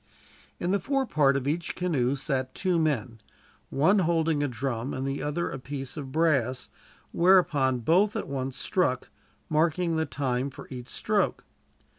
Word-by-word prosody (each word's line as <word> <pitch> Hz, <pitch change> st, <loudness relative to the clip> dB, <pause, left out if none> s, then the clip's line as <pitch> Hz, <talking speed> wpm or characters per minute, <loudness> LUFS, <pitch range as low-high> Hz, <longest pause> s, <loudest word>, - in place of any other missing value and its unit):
In 175 Hz, -, -1 dB
the 200 Hz, -, +2 dB
fore 270 Hz, +7 st, 0 dB
part 140 Hz, -, +3 dB
of 135 Hz, 0 st, -3 dB
each 165 Hz, +4 st, -2 dB
canoe 140 Hz, -8 st, 0 dB
sat 135 Hz, -2 st, -2 dB
two 180 Hz, -3 st, +1 dB
men, 125 Hz, -8 st, -1 dB, 0.5 s
one 185 Hz, +9 st, +3 dB
holding 165 Hz, -3 st, +1 dB
a 145 Hz, -, +1 dB
drum 125 Hz, 0 st, -3 dB
and 130 Hz, -, -3 dB
the 135 Hz, +1 st, -2 dB
other 150 Hz, +4 st, -2 dB
a 135 Hz, -, -5 dB
piece 135 Hz, 0 st, -6 dB
of 140 Hz, -4 st, -6 dB
brass; 135 Hz, -6 st, +1 dB, 0.4 s
whereon 150 Hz, -8 st, +4 dB
both 185 Hz, -, +3 dB
at -, -, -3 dB
once 135 Hz, -1 st, -4 dB
struck, 130 Hz, -9 st, 0 dB, 0.4 s
marking 165 Hz, +2 st, +1 dB
the 160 Hz, -1 st, 0 dB
time 130 Hz, -1 st, -1 dB
for 130 Hz, -, -11 dB
each 125 Hz, -1 st, -7 dB
stroke. -, -, 0 dB
145 Hz, 160 wpm, -27 LUFS, 130-170 Hz, 0.5 s, whereon